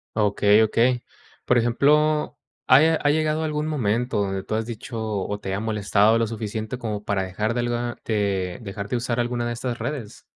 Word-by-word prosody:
Ah, 110 Hz, -, +2 dB
okey, 105 Hz, +1 st, +4 dB
okey. 120 Hz, +3 st, +2 dB, 0.4 s
Por 125 Hz, -, +3 dB
ejemplo, 150 Hz, +6 st, +2 dB, 0.3 s
¿ha 130 Hz, +2 st, +7 dB
ya 160 Hz, +1 st, +4 dB
ha 145 Hz, -, 0 dB
llegado 155 Hz, +1 st, +1 dB
a -, -, -1 dB
algún 150 Hz, 0 st, -2 dB
momento 125 Hz, -5 st, 0 dB
donde 95 Hz, -1 st, -2 dB
tú 110 Hz, -, -4 dB
has 110 Hz, 0 st, -1 dB
dicho, 115 Hz, 0 st, -6 dB
o, 105 Hz, -1 st, -3 dB
te 95 Hz, -1 st, -3 dB
ha 100 Hz, -, -2 dB
molestado 105 Hz, 0 st, +2 dB
lo 115 Hz, -, +1 dB
suficiente 110 Hz, +1 st, -4 dB
como 110 Hz, -4 st, -4 dB
para 100 Hz, -2 st, -1 dB
dejar 105 Hz, +5 st, -2 dB
de 120 Hz, -, 0 dB
algo 120 Hz, 0 st, -2 dB
te 115 Hz, -, -3 dB
de 100 Hz, -3 st, -1 dB
dejar 100 Hz, -1 st, -6 dB
de 125 Hz, -, -1 dB
usar 120 Hz, 0 st, -1 dB
alguna 120 Hz, 0 st, -1 dB
de 120 Hz, -, -2 dB
estas 120 Hz, 0 st, -4 dB
redes? 135 Hz, -9 st, -5 dB
115 Hz, 210 wpm, -24 LUFS, 105-125 Hz, 0.4 s, ha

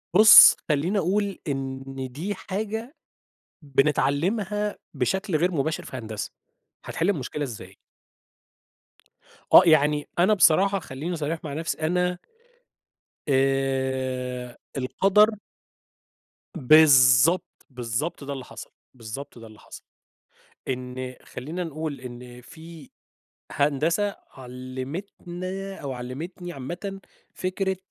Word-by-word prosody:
بُص، 215 Hz, +3 st, +10 dB
خلّيني 155 Hz, +7 st, +1 dB
أقول 200 Hz, +2 st, 0 dB
إن 135 Hz, -2 st, -3 dB, 0.3 s
دي 175 Hz, +10 st, -4 dB
حاجة 220 Hz, -, -5 dB, 0.7 s
بنتعلّمها 175 Hz, -, 0 dB, 0.2 s
بشكل 160 Hz, -, -1 dB
غير 175 Hz, +4 st, +1 dB
مباشر 155 Hz, 0 st, -2 dB
في -, -, -8 dB
هندسة، 110 Hz, -4 st, -6 dB, 0.5 s
هتحِل 170 Hz, +4 st, -1 dB
المشكلة 150 Hz, -4 st, -3 dB
ازاي؟ 100 Hz, -7 st, -9 dB, 1.8 s
آه. -, -, +11 dB
يعني 150 Hz, -2 st, +3 dB
أنا 185 Hz, +5 st, +5 dB
بصراحة 195 Hz, +1 st, +4 dB
خلّيني 160 Hz, +3 st, -5 dB
صريح 160 Hz, +1 st, -3 dB
مع 150 Hz, -3 st, -5 dB
نفسي، 160 Hz, +3 st, -3 dB
أنا 180 Hz, +2 st, 0 dB, 1.1 s
آآ 130 Hz, -2 st, -1 dB, 0.2 s
القدر 195 Hz, +11 st, +3 dB, 1.3 s
بالضبط، 140 Hz, +1 st, +5 dB
بالضبط 125 Hz, +5 st, -4 dB
ده 140 Hz, 0 st, -5 dB
اللي 130 Hz, -2 st, -7 dB
حصل. -, -, -10 dB, 0.2 s
بالضبط 125 Hz, +2 st, -9 dB
ده 115 Hz, -, -11 dB
اللي 110 Hz, -1 st, -16 dB
حصل. -, -, -13 dB, 0.9 s
إن 130 Hz, 0 st, -5 dB
خلّينا 160 Hz, +8 st, -6 dB
نقول 155 Hz, -3 st, -5 dB
إن 125 Hz, -1 st, -10 dB
في 160 Hz, +2 st, -13 dB, 0.6 s
هندسة 160 Hz, +8 st, 0 dB, 0.2 s
علّمتنا 175 Hz, +9 st, -7 dB
أو 140 Hz, -7 st, -6 dB
علّمتني 155 Hz, +9 st, -7 dB
عامةً 175 Hz, +9 st, -6 dB, 0.3 s
فكرة 190 Hz, +1 st, -2 dB
150 Hz, 100 wpm, -25 LUFS, 130-180 Hz, 1.8 s, آه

